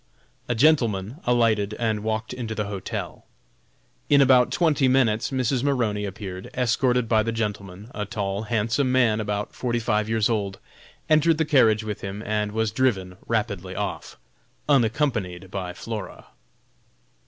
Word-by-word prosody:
A 120 - +1
gentleman 115 -5 +2
alighted 110 -4 +2
and 110 -2 -1
walked 110 +1 -2
into 115 -3 -5
the 105 0 -2
hotel. 100 -2 -6 0.8
In 145 - +6
about 125 -3 +5
twenty 150 -3 +2
minutes 120 -4 +2
Mrs. 130 -1 0
Maroney 115 -7 0
appeared 95 -2 -7
escorted 125 -1 +1
by 110 -1 +3
the 115 +2 -1
gentleman 105 -1 -4
a 105 - -3
tall, 100 -2 -3
handsome 115 +4 0
man, 120 -4 +3
about 105 -1 -3
forty 120 -2 -2
five 110 -2 0
years 110 -2 +2
old 100 -4 -2 0.5
entered 155 +1 +4
the 160 - +1
carriage 115 -8 +4
with 105 -1 -5
him 100 +2 -6
and 105 0 -1
was 110 0 0
driven 100 -6 0
rapidly 100 -5 -2
off, 100 0 -4 0.5
unaccompanied 115 - 0
by 95 -2 -4
Flora. 105 +2 -7
110 Hz, 140 wpm, -24 LUFS, 105-125 Hz, 0.8 s, In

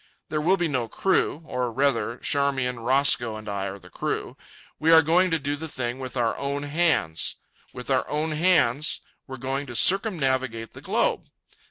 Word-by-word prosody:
There 155 0 -1
will 185 +5 +3
be 175 -2 0
no 130 -6 -1
crew. 170 - 0
Or, 125 -5 -2
rather, 130 -2 0
Charmian, 135 -4 0
Roscoe, 120 -2 +2
and 110 0 -9
I 100 -1 -3
are 95 - -6
the 90 -2 -17
crew. - - -3 0.4
We 160 +2 +3
are 160 0 +8
going 175 +4 +3
to 165 - +1
do 145 -1 -3
the 160 +2 -6
thing 130 -3 -4
with 130 0 -6
our 115 -2 +1
own 140 +1 -3
hands. 145 - +1 0.4
With - - -7
our - - +1
own 155 +2 -1
hands 155 -2 +2 0.3
we're 130 -1 -7
going 135 +2 -3
to 120 - -7
circumnavigate 130 - +1
the - - -11
globe. - - 0
140 Hz, 180 wpm, -25 LUFS, 120-155 Hz, 0.4 s, are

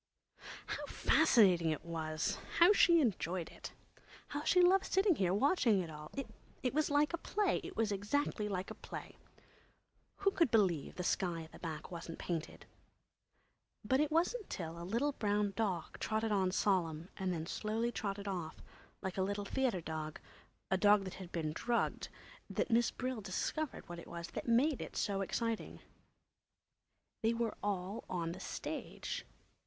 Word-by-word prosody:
Oh, - - -16 0.2
how - - -4
fascinating 190 - +5
it 155 +2 -2
was! 165 +3 -2 0.2
How 345 +5 +8
she 340 -4 +6
enjoyed 185 - 0
it! - - -8 0.6
How 290 +1 -3
she 360 - +4
loved 375 +2 +5
sitting 385 0 +5
here, 190 - +1
watching 230 - +3
it 170 -3 -3
all! 150 0 -9 0.5
It 250 - +1
was 305 +1 +2
like 295 +2 +3
a 340 - -1
play. 405 0 +1
It - - -8
was 220 -2 +2
exactly 210 +1 0
like 190 -1 -3
a - - -3
play. - - -8 1.0
Who 395 0 +2
could 335 -7 +3
believe 190 -10 +2
the 180 - -3
sky 175 -3 0
at 160 - -13
the - - -12
back 160 -1 -6
wasn't 165 -1 -6
painted? 165 -3 -4 1.2
But 260 +5 +3
it 300 0 +3
wasn't 360 +7 +1
till 170 -1 -5
a - - -5
little 235 +11 +1
brown 205 -5 0
dog 195 -7 -2
trotted 220 0 0
on 190 -3 +3
solemn 175 -4 +1
and 190 -1 -1
then 165 -2 -2
slowly 220 +6 -1
trotted 200 -2 -3
off, 175 -5 -3 0.5
like 190 0 -3
a - - +3
little 200 +1 -1
"theatre" 240 -5 0
dog, 155 -1 -5 0.5
a 190 - +4
little 205 +2 +4
dog 205 -1 +6
that 185 -1 -6
had 185 -2 -9
been 155 -3 -2
drugged, 235 +7 0 0.4
that - - -1
Miss 235 +1 +4
Brill 255 -3 -3
discovered 255 - -3
what 175 0 -7
it - - -11
was 170 0 -6
that - - -5
made 255 +5 +3
it - - -6
so 195 -2 0
exciting. 230 +3 -2 1.4
They 225 +1 +2
were 230 -1 0
all 200 +1 -2
on 170 -2 -1
the 180 - -7
stage. - - -5
200 Hz, 170 wpm, -35 LUFS, 175-240 Hz, 1.4 s, How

